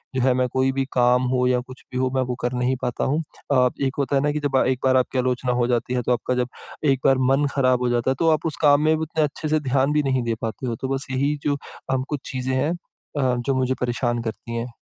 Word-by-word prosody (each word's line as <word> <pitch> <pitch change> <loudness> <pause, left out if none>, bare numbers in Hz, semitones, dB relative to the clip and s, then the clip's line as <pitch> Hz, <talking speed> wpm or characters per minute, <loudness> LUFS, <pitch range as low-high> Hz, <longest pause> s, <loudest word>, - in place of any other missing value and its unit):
जो 130 - +1
है 130 0 +4
मैं 125 0 +1
कोई 130 0 +2
भी 135 0 -1
काम 125 0 +4
हो 125 -1 +2
या 125 -1 +3
कुछ 130 0 -12
भी 125 - -3
हो, 130 0 +1
मैं 130 - +2
वो 125 -1 -2
कर 120 +1 -1
नहीं 125 +1 +1
पाता 125 -1 -2
हूँ। 150 +4 +1 0.3
अ, 125 -2 +4
एक 135 -1 0
होता 140 0 0
है 135 - +3
ना 150 +1 +1
कि 150 - -2
जब 140 -3 +2
एक 130 -1 0
बार 130 0 +5
आपकी 130 +1 0
आलोचना 125 0 0
हो 120 - +2
जाती 120 0 0
है, 125 - +1
तो 125 - -1
आपका 120 +2 -1
जब 125 -1 0 0.4
एक 135 -3 +3
बार 135 - +5
मन 140 +2 +3
खराब 130 -2 +3
हो 125 - +1
जाता 120 +1 +1
है, - - 0
तो 165 - +3
आप 155 0 0
उस 160 - -1
काम 145 -1 +5
में 155 - +4
उतने 160 0 -1
अच्छे 150 +1 -3
से 155 +1 +3
ध्यान 135 +2 +2
भी 150 0 +2
नहीं 130 -2 +1
दे 115 -1 -1
पाते 115 +3 -4
हो। 115 - -1
तो 130 - -1
बस 135 - -5
यही 140 +3 +1
जो 145 -1 +1 0.4
अम 130 0 0
कुछ 150 - -2
चीज़ें 130 0 -2
हैं 140 +5 +1 0.5
अ, 130 -3 +2
जो 120 +3 0
मुझे 130 0 +1
परेशान 120 -1 0
करती 115 +1 -5
हैं। 115 +1 -2
130 Hz, 280 wpm, -23 LUFS, 125-140 Hz, 0.5 s, बार